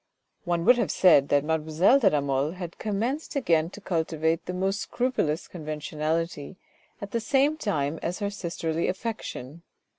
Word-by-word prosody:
One 175 Hz, -1 st, 0 dB
would 245 Hz, 0 st, +6 dB
have 225 Hz, -, 0 dB
said 150 Hz, -7 st, +5 dB
that 145 Hz, -1 st, +3 dB
mademoiselle 160 Hz, -, +3 dB
de 235 Hz, -, +5 dB
la 150 Hz, -, +1 dB
Mole 140 Hz, +2 st, 0 dB
had 175 Hz, -2 st, -8 dB
commenced 235 Hz, +10 st, -2 dB
again 165 Hz, -, +2 dB
to 200 Hz, -, -11 dB
cultivate 160 Hz, -3 st, -1 dB
the -, -, -2 dB
most 195 Hz, +2 st, 0 dB
scrupulous 240 Hz, -11 st, -1 dB
conventionality 155 Hz, +1 st, -3 dB, 0.4 s
at 200 Hz, 0 st, -7 dB
the 230 Hz, -, 0 dB
same 275 Hz, +6 st, +2 dB
time 160 Hz, -, -2 dB
as 175 Hz, +2 st, -2 dB
her 205 Hz, -1 st, -2 dB
sisterly 170 Hz, -4 st, -2 dB
affection. 180 Hz, -, -5 dB
170 Hz, 155 wpm, -26 LUFS, 155-205 Hz, 0.4 s, would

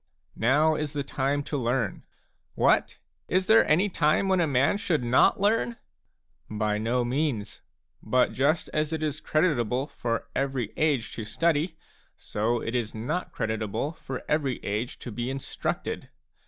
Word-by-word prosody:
Now 145 Hz, +7 st, +3 dB
is 150 Hz, -1 st, -3 dB
the 145 Hz, -1 st, -2 dB
time 140 Hz, +1 st, -1 dB
to 145 Hz, -, -3 dB
learn. 120 Hz, -5 st, -1 dB, 0.3 s
" -, -, -46 dB
What? -, -, +3 dB, 0.3 s
Is 185 Hz, +1 st, +1 dB
there 220 Hz, +3 st, +6 dB
any 180 Hz, +7 st, +4 dB
time 165 Hz, 0 st, +2 dB
when 190 Hz, -1 st, +3 dB
a 170 Hz, -, +3 dB
man 140 Hz, +8 st, +2 dB
should 160 Hz, -9 st, 0 dB
not 125 Hz, -, +4 dB
learn? 225 Hz, +3 st, +1 dB, 0.4 s
" 65 Hz, -, -46 dB
By 105 Hz, -1 st, -1 dB
no 120 Hz, +3 st, 0 dB
means; 120 Hz, -6 st, -2 dB, 0.4 s
but 125 Hz, -1 st, +2 dB
just 150 Hz, +5 st, +1 dB
as 155 Hz, 0 st, -1 dB
it 160 Hz, -1 st, -2 dB
is 150 Hz, -1 st, -2 dB
creditable 135 Hz, -6 st, +1 dB
for 115 Hz, -5 st, -3 dB
every 135 Hz, -5 st, -1 dB
age 145 Hz, -7 st, +1 dB
to -, -, -3 dB
studyj 155 Hz, -, 0 dB, 0.4 s
so 115 Hz, +3 st, -1 dB
it 115 Hz, -, -4 dB
is 120 Hz, -3 st, -2 dB
not 120 Hz, +11 st, -3 dB
creditable 110 Hz, +4 st, -2 dB
for 135 Hz, -5 st, -7 dB
every 145 Hz, -4 st, +1 dB
age 105 Hz, +4 st, -2 dB
to 120 Hz, -, -8 dB
be 120 Hz, +3 st, -3 dB
instructed. 135 Hz, 0 st, -4 dB
135 Hz, 160 wpm, -27 LUFS, 115-155 Hz, 0.4 s, there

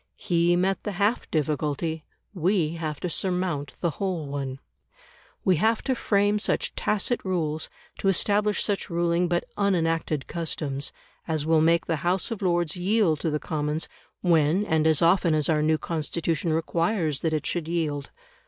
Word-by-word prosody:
He 175 Hz, 0 st, +2 dB
met 190 Hz, +2 st, +1 dB
the 210 Hz, -, -4 dB
half 205 Hz, +5 st, 0 dB
difficulty; 155 Hz, +1 st, -1 dB, 0.3 s
we 180 Hz, -2 st, +1 dB
have 155 Hz, -3 st, -4 dB
to -, -, -1 dB
surmount 180 Hz, -4 st, -1 dB
the 170 Hz, -, +1 dB
whole 185 Hz, -5 st, -1 dB
one. 140 Hz, -2 st, -4 dB, 0.9 s
We 185 Hz, -3 st, +4 dB
have 220 Hz, +6 st, +2 dB
to 265 Hz, -, +1 dB
frame 205 Hz, -3 st, +2 dB
such -, -, 0 dB
tacit 215 Hz, +4 st, 0 dB
rules, 160 Hz, -5 st, -1 dB, 0.3 s
to 195 Hz, -, -1 dB
establish 205 Hz, +2 st, +2 dB
such 205 Hz, -2 st, -1 dB
ruling 170 Hz, 0 st, +1 dB
but 175 Hz, 0 st, 0 dB
unenacted 165 Hz, -7 st, +1 dB
customs, 150 Hz, -4 st, -3 dB, 0.4 s
as 155 Hz, -3 st, -1 dB
will 160 Hz, -1 st, +4 dB
make 165 Hz, +1 st, +3 dB
the 165 Hz, -, 0 dB
House 175 Hz, +8 st, 0 dB
of 225 Hz, -, -4 dB
Lords 175 Hz, -4 st, +1 dB
yield 180 Hz, -3 st, +2 dB
to 160 Hz, -, -1 dB
the 150 Hz, -, 0 dB
Commons 150 Hz, 0 st, -2 dB, 0.3 s
when 170 Hz, +2 st, +3 dB
and 160 Hz, -4 st, +2 dB
as 160 Hz, 0 st, +3 dB
often 170 Hz, -1 st, +4 dB
as 150 Hz, -2 st, +1 dB
our 155 Hz, -2 st, +3 dB
new 155 Hz, +1 st, +3 dB
Constitution 165 Hz, 0 st, -2 dB
requires 165 Hz, -1 st, 0 dB
that 160 Hz, -, 0 dB
it 155 Hz, -2 st, -1 dB
should 170 Hz, -3 st, -2 dB
yield. 155 Hz, -4 st, -2 dB
170 Hz, 160 wpm, -26 LUFS, 155-185 Hz, 0.9 s, We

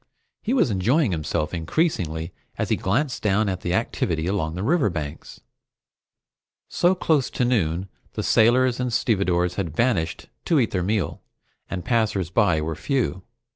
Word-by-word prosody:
He 225 Hz, -, -2 dB
was 185 Hz, -, +3 dB
enjoying 115 Hz, -, +2 dB
himself 75 Hz, -1 st, -2 dB
increasingly 85 Hz, -, -1 dB, 0.2 s
as -, -, -2 dB
he -, -, +3 dB
glanced 125 Hz, +8 st, -1 dB
down 105 Hz, +1 st, +2 dB
at 95 Hz, -2 st, -2 dB
the 90 Hz, +1 st, -1 dB
activity 80 Hz, -3 st, -1 dB
along 85 Hz, -4 st, -1 dB
the 90 Hz, -, -3 dB
riverbanks. 100 Hz, -, -1 dB, 1.3 s
So 175 Hz, +2 st, +2 dB
close 155 Hz, -7 st, +1 dB
to 125 Hz, -, 0 dB
noon, 95 Hz, -7 st, 0 dB, 0.3 s
the -, -, -3 dB
sailors 125 Hz, +2 st, +4 dB
and 125 Hz, -1 st, -1 dB
stevedores 90 Hz, -6 st, +1 dB
had 85 Hz, -6 st, -3 dB
vanished 100 Hz, -10 st, 0 dB, 0.2 s
to 165 Hz, -4 st, +3 dB
eat 115 Hz, -, +1 dB
their 90 Hz, -, 0 dB
meal, 100 Hz, +2 st, -1 dB, 0.5 s
and 90 Hz, -2 st, -4 dB
passers 110 Hz, -, 0 dB
by 90 Hz, -5 st, +3 dB
were 80 Hz, +1 st, -2 dB
few. 125 Hz, -, -1 dB
100 Hz, 150 wpm, -24 LUFS, 85-125 Hz, 1.3 s, sailors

